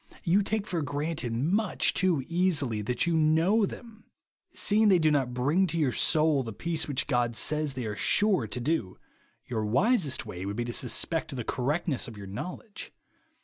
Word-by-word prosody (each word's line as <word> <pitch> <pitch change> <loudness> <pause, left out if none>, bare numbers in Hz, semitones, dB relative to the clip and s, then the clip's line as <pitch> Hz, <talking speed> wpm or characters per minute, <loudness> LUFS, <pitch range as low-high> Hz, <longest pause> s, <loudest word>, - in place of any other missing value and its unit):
You 185 +4 +3
take 210 +1 -2
for 175 -5 -2
granted 145 -2 -3
much 175 - +1
too 175 -7 +1
easily 165 - +1
that 120 +4 -1
you 170 -1 0
know 165 +7 +3
them. 225 0 -11 0.5
Seeing 215 +1 +3
they 190 -3 +5
do 155 -2 +2
not 130 -4 0
bring 150 +10 +2
to 170 0 -3
your 145 -6 +1
soul 155 +5 +2
the 115 -3 -6
peace 160 +8 -2
which 140 -4 0
God 120 -3 0
says 150 +1 +1
they 125 -2 -4
are 105 -1 -4
sure 195 - +2
to 125 - -5
do, 125 - -2 0.5
your 110 -3 -3
wisest 150 - +1
way 95 -4 -7
would 100 +1 -4
be 120 +1 -2
to 120 - -4
suspect 150 +5 0
the 125 - -4
correctness 140 +5 -2
of 115 -3 -10
your 100 - -8
knowledge. 180 - -8
150 Hz, 185 wpm, -28 LUFS, 120-175 Hz, 0.5 s, they